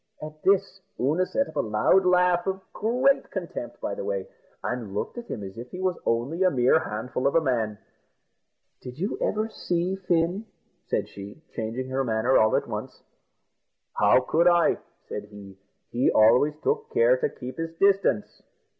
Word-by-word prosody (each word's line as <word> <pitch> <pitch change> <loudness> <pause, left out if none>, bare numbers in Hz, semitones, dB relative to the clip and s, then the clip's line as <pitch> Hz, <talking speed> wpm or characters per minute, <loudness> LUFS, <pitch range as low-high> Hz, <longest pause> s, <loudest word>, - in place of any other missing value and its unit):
At 155 0 -9
this 195 0 +2 0.2
Oonagh 160 +8 +1
set 275 - 0
up - - -10
a - - +2
loud 110 - +3
laugh, 180 -1 +3
of 190 0 -1
great 250 +5 +2
contempt, - - -6
by - - -3
the - - -5
way, - - -3 0.4
and 115 -6 -4
looked 175 - -3
at 235 - -10
him 105 - -5
as 95 +3 -8
if 120 +1 -8
he 180 - -8
was 185 -1 0
only 125 +10 0
a 185 - +5
mere 130 0 +3
handful 125 -1 -3
of 140 - 0
a - - +7
man. 115 -8 -1 1.0
"Did 125 +1 -9
you 190 +6 -3
ever 215 +1 0
see 180 -3 -2
Fin?" 180 +2 0 0.4
said - - -1
she, 100 +10 -11
changing 115 +3 -4
her 135 +1 0
manner 115 +2 +1
all 110 0 +4
at - - 0
once. - - -6 0.9
"How 105 +5 +4
could 165 +7 +2
I?" 175 -1 +4 0.3
said 105 - -5
he; 100 -2 -12 0.4
"he 120 +2 +2
always 125 +7 +4
took 450 +1 0
care 485 +3 +4
to 465 -2 0
keep 125 - -9
his 165 0 -4
distance." 195 - +1
160 Hz, 175 wpm, -26 LUFS, 120-190 Hz, 1.0 s, a